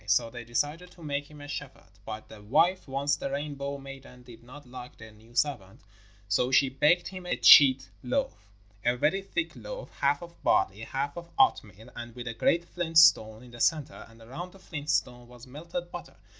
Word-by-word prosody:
So 115 +4 +2
they 120 -1 -8
decided 145 +9 -2
to 170 - -15
make 145 -1 -3
him 150 -1 -13
a 145 - -9
shepherd. 130 -9 -9
But 110 0 -7
the 110 -1 -13
wife, 170 - +2
once 140 +2 0
the 140 - -5
Rainbow 140 0 -4
maiden, 135 -2 -12
did 120 -2 -14
not 135 +5 -13
like 125 0 -11
the 110 0 -12
new 110 +3 -20
servant, 115 -11 -1 0.5
so 100 +5 +1
she 135 0 +4
baked 150 +7 +2
him 185 -2 -9
a - - -1
cheat 130 -8 +7
loaf 105 -4 -3 0.4
a 120 +1 +1
very 155 +9 +1
thick 320 +12 -3
loaf, - - -8
half 140 +3 +1
of 170 0 -13
barley, 95 +1 +2
half 135 +5 -4
of 170 0 -8
oatmeal, 110 - +1
and 120 -1 -8
with 125 -1 -7
a 115 - -3
great 170 +9 +1
flint 165 -2 -3
stone 110 -8 +5
in 125 - -14
the 120 - -12
centre, 155 -4 0
and 115 0 -17
around 170 +10 -8
the - - -15
flint 150 -5 -7
stone 120 -4 -1
was 120 0 -14
melted 170 +6 -7
butter. 175 - -9
135 Hz, 200 wpm, -28 LUFS, 120-155 Hz, 0.5 s, cheat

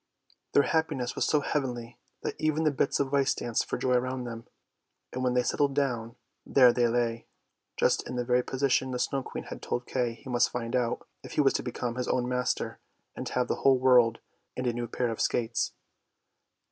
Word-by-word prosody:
Their 140 - +6
happiness 150 -7 0
was - - 0
so 150 - +3
heavenly 120 -5 -3 0.2
that - - -2
even 155 0 +1
the 155 - +3
bits 140 0 0
of 140 0 -1
ice 140 -1 +3
danced 120 -2 -1
for - - -1
joy 130 - +1
around 130 +1 0
them; 115 -1 -7 0.7
and 130 - -3
when 125 -1 +1
they 125 - +3
settled 140 +2 +1
down, 120 -5 -1 0.3
there 125 -3 +6
they 120 -1 +3
lay! 115 -1 -1 0.5
just - - +2
in 125 - -4
the 125 0 -1
very 125 +1 +3
position 130 0 +1
the 125 - -2
Snow 135 +2 0
Queen - - -6
had - - -8
told 120 - -3
Kay 120 -3 -1
he 135 - -15
must 120 -1 +2
find 120 0 -3
out, 120 -2 -1
if - - -10
he - - +3
was 135 -2 +4
to - - 0
become 120 -1 -4
his 125 - -2
own 125 -1 +1
master 125 0 -1 0.4
and - - -5
have 125 -1 0
the - - -1
whole 135 -1 +4
world 125 -3 +5 0.4
and 130 - -2
a 120 - +1
new 120 0 -3
pair 120 0 -1
of 115 - -4
skates. 115 -1 0
125 Hz, 210 wpm, -29 LUFS, 120-135 Hz, 0.7 s, Their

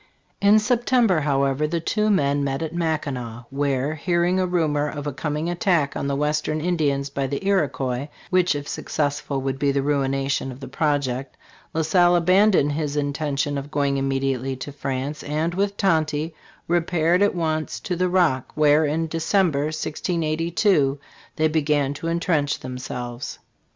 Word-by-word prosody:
In 200 +2 +6
September, 235 -4 +2
however, 140 0 +1
the 170 +2 -1
two 210 +6 0
men 145 -7 +2
met 135 +3 -1
at 160 0 -4
Mackinac, 140 -8 -3
where, 140 +1 0
hearing 175 +3 +1
a 185 - +1
rumor 150 -4 +1
of 145 -1 -6
a 145 - -3
coming 150 +3 -2
attack 175 -5 +1
on - - -2
the 140 - 0
western 150 +1 0
Indi 160 -3 +1
ans 140 0 -3
by 140 -1 -1
the 140 +7 -4
Iroquois 135 -8 0 0.2
(which 180 -4 +3
if 145 0 -5
successful 145 -2 -2
would 135 0 -3
be 140 0 +2
the 140 0 0
ruination 135 -1 0
of 125 - -10
his 135 -2 -9
pro 150 0 +2
ject), 130 -1 -5 0.4
La 160 - +1
Salle 175 +2 +4
abandoned 185 -2 +4
his 150 -1 -2
intention 145 0 -1
of 140 +1 -8
going 140 -1 0
immediately 135 -1 -1
to 130 +3 -7
France, 140 +1 -4
and 155 +3 -1
with 200 +2 -1
Tonty, 160 -4 +1 0.3
repaired 175 +1 +2
at 205 -1 +3
once 155 -2 -2
to 180 - -2
the 180 +1 +1
Rock, 170 -8 +2
where, 150 0 +4
in 155 +3 0
December, 165 -2 +1
1682, 160 0 0 0.4
theyi 155 0 +2
began 145 -3 +1
to 155 +3 -6
entrench 165 -4 0
themselves. 125 -1 -6
150 Hz, 160 wpm, -23 LUFS, 140-170 Hz, 0.4 s, In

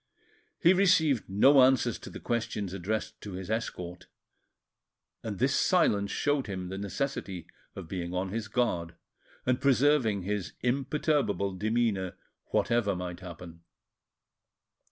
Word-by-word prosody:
He 175 - +6
received 165 - +3
no 130 +8 +6
answers 130 -3 +3
to - - -9
the - - -9
questions 110 -5 -2
addressed 110 +3 -3
to 100 - -7
his 95 +2 -5
escort, 90 -6 -4 1.1
and - - -5
this - - +2
silence 100 -1 +3
showed 145 +3 0
him 95 -3 -5
the 95 +1 -5
necessity 100 - -3 0.3
of 95 - -7
being 90 -1 -4
on 90 +1 -2
his 110 +2 -3
guard 100 -8 -1 0.5
and 125 +1 +1
preserving 130 -6 +3
his 100 -1 -3
imperturbable 130 - 0
demeanour 105 -2 0 0.3
whatever 115 -5 +1
might 90 -1 -5
happen. 85 -2 -10
105 Hz, 125 wpm, -29 LUFS, 95-125 Hz, 1.1 s, He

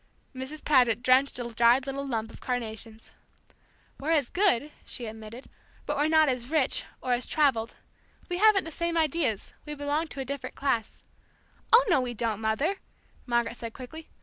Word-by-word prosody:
Mrs. 265 +4 -7
Paget 245 -5 +4
drenched 255 +2 +4
a 245 - -3
dried 240 +3 +4
little 275 0 -4
dump 225 -3 -2
of - - -13
carnations. 225 -2 -5 0.9
"We're 290 - -4
as 290 -6 +1
good," 335 - +2
she 245 - -5
admitted; 220 +3 -9 0.4
"but 295 - -1
we're 295 +1 +2
not 315 -1 +5
as 250 -2 -2
rich, 300 -4 +2 0.2
or 255 - +1
as 245 +1 -1
travelled, 260 -7 +1 0.5
we 355 0 -2
haven't 425 -2 +5
the 325 - -7
same 340 +1 -1
ideas; 305 -9 0
we 300 -1 -6
belong 290 +3 -1
to 280 - -9
a 265 - -3
different 265 -1 -5
class." 235 -6 -2 0.7
"Oh, 485 +2 +7
no, 345 -9 +4
we 245 -1 -4
don't, 220 -2 -2
Mother," 275 - 0 0.5
Margaret 235 -1 0
said 230 -1 -6
quickly. 315 +5 -10
265 Hz, 175 wpm, -28 LUFS, 235-305 Hz, 0.9 s, Oh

